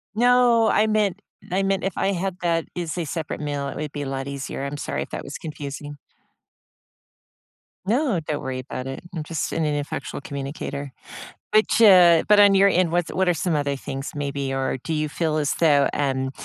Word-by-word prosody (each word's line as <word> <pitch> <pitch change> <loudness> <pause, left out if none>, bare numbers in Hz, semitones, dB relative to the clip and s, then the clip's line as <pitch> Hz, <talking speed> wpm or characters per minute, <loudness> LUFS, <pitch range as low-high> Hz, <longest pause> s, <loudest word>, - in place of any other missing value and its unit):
No. 240 -1 +4
I 215 +1 +3
meant 210 -2 +1 0.3
I 190 - +1
meant 195 -1 0
if 195 -2 -3
I 195 - +1
had 185 0 -3
that 165 -2 0
as 175 -1 -4
a 170 - -2
separate 155 +1 -4
meal, 145 -1 -3
it - - -6
would 150 -1 -4
be 145 - -5
a - - -5
lot 135 0 -4
easier. 140 0 -5
I'm 140 +1 -4
sorry 70 - -3
if - - -12
that - - -5
was - - -7
confusing. 145 -1 -7 1.9
No. 235 - +1
Don't 150 -1 -4
worry 130 -1 -4
about 130 0 -6
it. 135 - -6
I'm 155 - -3
just 160 0 -3
an 165 -1 0
ineffectual 145 -1 -3
communicator. 140 0 -5 0.6
Which, 215 +1 +3
uh, 180 -6 +7
but 210 0 +6
on 200 -1 +7
your 195 +1 +6
end, 180 -3 +2
what's 175 -1 0
what 185 -1 +1
are - - +4
some 165 0 -1
other 145 -1 0
things 135 +1 -6
maybe? 140 -1 -3
Or 135 0 -1
do 165 - -5
you 155 0 0
feel 155 0 -1
as 145 -1 +1
though, 145 -4 +4
um, 135 -2 -1
155 Hz, 200 wpm, -23 LUFS, 140-190 Hz, 1.9 s, uh